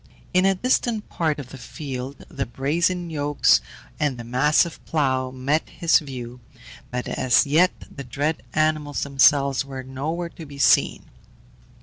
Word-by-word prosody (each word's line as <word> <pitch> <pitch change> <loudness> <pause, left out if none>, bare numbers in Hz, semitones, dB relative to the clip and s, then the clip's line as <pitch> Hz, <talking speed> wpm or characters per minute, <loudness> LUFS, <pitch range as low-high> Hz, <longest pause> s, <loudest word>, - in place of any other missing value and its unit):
In 185 +1 +4
a 195 - +3
distant 235 0 0
part 155 -3 -1
of 140 -4 -8
the 135 - -10
field 130 +2 -7
the 135 -2 -4
brazen 170 +8 -1
yokes 145 - +3 0.4
and 145 -4 0
the 120 - -7
massive 150 +7 +1
plough 130 -4 0
met 135 +5 -1
his 170 -2 +3
view, 125 -4 -8 0.5
but 125 0 -4
as 125 -2 +3
yet 160 +6 +4 0.2
the 140 - -9
dread 145 +5 -2
animals 155 -2 0
themselves 140 -1 +3
were 135 -1 -7
nowhere 155 +7 -4
to 165 - -11
be 140 0 -11
seen. 140 - +3
145 Hz, 145 wpm, -23 LUFS, 130-160 Hz, 0.5 s, In